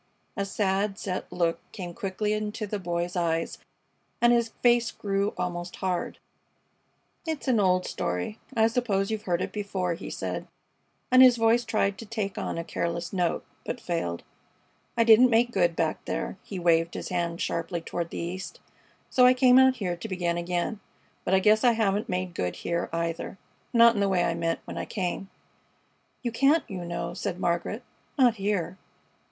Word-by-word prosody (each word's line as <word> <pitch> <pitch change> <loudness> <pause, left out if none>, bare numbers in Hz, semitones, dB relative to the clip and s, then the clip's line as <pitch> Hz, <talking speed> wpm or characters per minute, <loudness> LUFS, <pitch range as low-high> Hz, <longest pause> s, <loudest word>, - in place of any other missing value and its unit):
A 200 - -1
sad, 195 0 0
set 185 -3 -4
look 170 -1 0
came 175 -3 -6
quickly 210 0 -2
into 215 0 -3
the 205 0 -4
Boy's 175 0 -2
eyes 165 -2 -1 0.6
and 240 0 +5
his 235 -1 +2
face 240 -1 +4
grew 200 0 -1
almost 175 0 -3
hard. 185 -2 -2 1.1
"It's 315 -3 -3
an 245 -4 +3
old 185 -2 +3
story. 90 - -3 0.2
I 220 - +5
suppose 220 -4 0
you've 215 -1 -3
heard 175 0 +1
it - - -4
before," 195 -4 -2
he 170 - -7
said, - - -4 0.6
and 255 0 +8
his 250 -2 +8
voice 230 +1 +3
tried 215 -4 0
to 225 - -8
take 205 -3 -3
on - - -3
a 165 - -2
careless 170 +1 -3
note, 180 -3 0 0.2
but 245 - -4
failed. 165 - -3 0.7
"I 230 - +5
didn't 230 +2 +7
make 240 +1 +3
good 175 -5 +2
back 160 -2 -1
there" - - -3
he 195 - -7
waved 170 -1 +2
his - - -5
hand 170 -1 -2
sharply 170 +1 -2
toward 170 +1 -4
the - - -7
East 180 +3 -5 0.5
"so 250 -1 +5
I 255 - +6
came 255 0 +6
out 260 0 +6
here 185 -7 -2
to 175 - -7
begin 175 -2 -1
again. 175 +5 -2 0.4
But 190 - +2
I - - +5
guess 215 +2 +4
I 240 -2 +6
haven't 215 0 0
made 185 -1 -2
good 90 - -2
here, 170 0 -2
either 165 +2 -3 0.3
not 235 -1 +7
in 210 - -2
the 200 -1 +2
way 180 -2 +2
I 170 - +1
meant 165 0 -1
when - - -6
I - - -3
came." 190 -1 -3 0.9
"You 240 - -1
can't, 280 +7 +3
you 185 -6 -6
know," 170 0 -4
said 180 0 -4
Margaret. 175 +6 -1 0.3
"Not 245 -4 +4
here." 195 -2 -1
195 Hz, 180 wpm, -27 LUFS, 175-225 Hz, 1.1 s, and